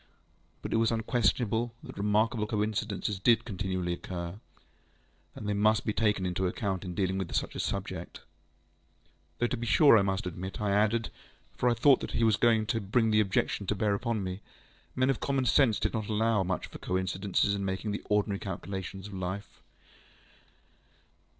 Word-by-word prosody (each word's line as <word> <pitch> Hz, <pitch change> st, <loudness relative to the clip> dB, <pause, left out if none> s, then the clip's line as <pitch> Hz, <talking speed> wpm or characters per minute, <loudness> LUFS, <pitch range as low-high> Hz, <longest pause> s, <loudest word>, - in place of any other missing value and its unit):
But -, -, -3 dB
it -, -, +3 dB
was 115 Hz, 0 st, +3 dB
unquestionable 115 Hz, 0 st, 0 dB
that -, -, -9 dB
remarkable 105 Hz, +2 st, +1 dB
coincidences 105 Hz, -1 st, -2 dB
did 115 Hz, +3 st, +3 dB
continually 95 Hz, -4 st, -2 dB
occur, 85 Hz, +2 st, -6 dB, 1.0 s
and 105 Hz, -, -6 dB
they 105 Hz, -, +1 dB
must 105 Hz, +1 st, +2 dB
be 105 Hz, -, 0 dB
taken 105 Hz, -4 st, +1 dB
into 90 Hz, +1 st, 0 dB
account 95 Hz, 0 st, -2 dB
in 90 Hz, -2 st, -6 dB
dealing 95 Hz, 0 st, 0 dB
with 95 Hz, -, -4 dB
such -, -, -1 dB
a -, -, -6 dB
subject. -, -, -4 dB, 1.2 s
Though 120 Hz, -, +1 dB
to 120 Hz, -, -1 dB
be 120 Hz, -1 st, -4 dB
sure 140 Hz, -2 st, +7 dB
I -, -, +3 dB
must 95 Hz, -1 st, -1 dB
admit, 90 Hz, +2 st, -5 dB
I 105 Hz, -2 st, 0 dB
added 110 Hz, +3 st, +2 dB, 0.4 s
(for 125 Hz, -, +2 dB
I 120 Hz, -, +2 dB
thought 130 Hz, +3 st, +5 dB
I -, -, -19 dB
saw -, -, -3 dB
that -, -, -9 dB
he 115 Hz, -, +2 dB
was 110 Hz, -3 st, +4 dB
going 110 Hz, 0 st, +3 dB
to 110 Hz, +1 st, -1 dB
bring 110 Hz, +3 st, +1 dB
the 105 Hz, -, +4 dB
objection 100 Hz, -1 st, 0 dB
to 105 Hz, -, +1 dB
bear 105 Hz, 0 st, +1 dB
upon 110 Hz, 0 st, -1 dB
me), 95 Hz, +2 st, -5 dB, 0.5 s
men 130 Hz, +1 st, +3 dB
of 130 Hz, -, -3 dB
common 135 Hz, -2 st, 0 dB
sense 125 Hz, -3 st, +4 dB
did -, -, -1 dB
not 110 Hz, -3 st, -2 dB
allow 110 Hz, -1 st, +2 dB
much 90 Hz, 0 st, -2 dB
for -, -, -11 dB
coincidences 95 Hz, +2 st, 0 dB
in 100 Hz, -1 st, -2 dB
making 95 Hz, +2 st, -2 dB
the 100 Hz, -, -3 dB
ordinary 105 Hz, -1 st, +1 dB
calculations 95 Hz, 0 st, -6 dB
of 105 Hz, -, -9 dB
life. 95 Hz, +2 st, -5 dB
105 Hz, 185 wpm, -29 LUFS, 95-115 Hz, 1.2 s, sure